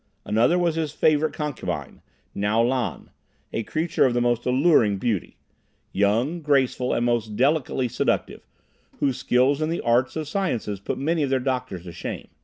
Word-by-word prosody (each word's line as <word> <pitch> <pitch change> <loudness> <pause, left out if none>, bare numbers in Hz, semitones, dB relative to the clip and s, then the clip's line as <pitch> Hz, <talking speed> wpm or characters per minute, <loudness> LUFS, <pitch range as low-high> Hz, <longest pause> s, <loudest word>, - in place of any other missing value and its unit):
Another 115 +11 +3
was 175 -2 +1
his 160 -2 -2
favorite 155 0 +2
concubine, 150 -2 -5 0.3
Ngo 110 +4 +2
Lan, 125 -2 -2 0.4
a - - -1
creature 160 +8 0
of 125 -2 +2
the - - +2
most 120 0 0
alluring 125 - +4
beauty; 105 -2 -2 0.5
young, 115 - +1
graceful 135 -4 +1
and 120 - +1
most 115 -3 0
delicately 135 0 +1
seductive, - - -1 0.6
whose 135 -3 +1
skill 130 +3 +2
in 155 - 0
the 170 - -2
arts 120 +2 +1
and 155 -2 -3
sciences 135 - -2
put 100 - -4
many 160 +4 0
of 140 - 0
their 135 -1 +2
doctors 125 -8 -3
to 90 - -8
shame. - - -6
130 Hz, 165 wpm, -24 LUFS, 115-150 Hz, 0.6 s, alluring